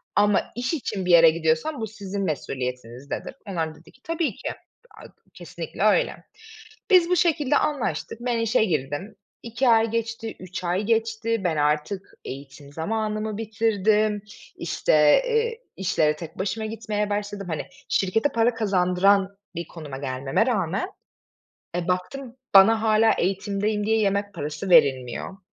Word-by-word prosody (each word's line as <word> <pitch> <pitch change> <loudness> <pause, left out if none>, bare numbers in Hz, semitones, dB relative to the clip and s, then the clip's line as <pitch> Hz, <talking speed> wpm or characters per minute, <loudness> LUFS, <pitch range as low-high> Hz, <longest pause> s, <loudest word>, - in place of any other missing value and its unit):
ama 205 -1 +4
iş 250 +6 -2
için 200 - -3
bir 180 - +1
yere 165 -1 +8
gidiyorsam 165 - 0
bu 220 - -2
sizin 200 -1 -5
mesuliyetinizdedir." 125 -4 -4
Onlar 165 -4 -2
da - - -15
dedi - - -18
ki, 260 - -26
"Tabii 330 -5 -1
ki, - - -5
aaa, - - -16 0.3
kesinlikle - - -6
öyle." - - +2 0.7
Biz 355 -2 +6
bu 360 - +3
şekilde 305 -5 +2
anlaştık, 280 -5 -2
ben 240 -1 0
işe 230 0 +2
girdim, 155 +5 -3 0.3
2 235 +2 0
ay 225 0 +4
geçti, 230 0 -3
3 185 0 -7
ay 180 +3 0
geçti, 225 0 0
ben 165 -4 0
artık 150 +6 -1
eğitim 140 +1 -9
zamanımı 215 +4 -2
bitirdim, 215 -1 +1 0.3
işte, 170 - -1 0.3
eee, 460 0 0 0.2
işlere 160 -5 +1
tek 160 0 -10
başıma 220 +3 -2
gitmeye 215 -1 -3
başladım. 205 -2 -3
Hani, 160 - -3 0.2
şirkete 220 +8 +1
para 230 -1 +2
kazandıran 195 -1 +2 0.2
bir 170 0 -4
konuma 150 -5 -8
gelmeme 135 - -1
rağmen, 200 - -1 0.9
eee, 175 0 -2
baktım 230 +8 -3 0.2
bana 220 +3 +7
hâlâ 220 0 +4
eğitimdeyim 200 +3 -1
diye 220 +1 +2
yemek 200 0 0
parası 155 +6 -5
verilmiyor. 140 +2 +3
205 Hz, 140 wpm, -24 LUFS, 170-225 Hz, 0.9 s, yere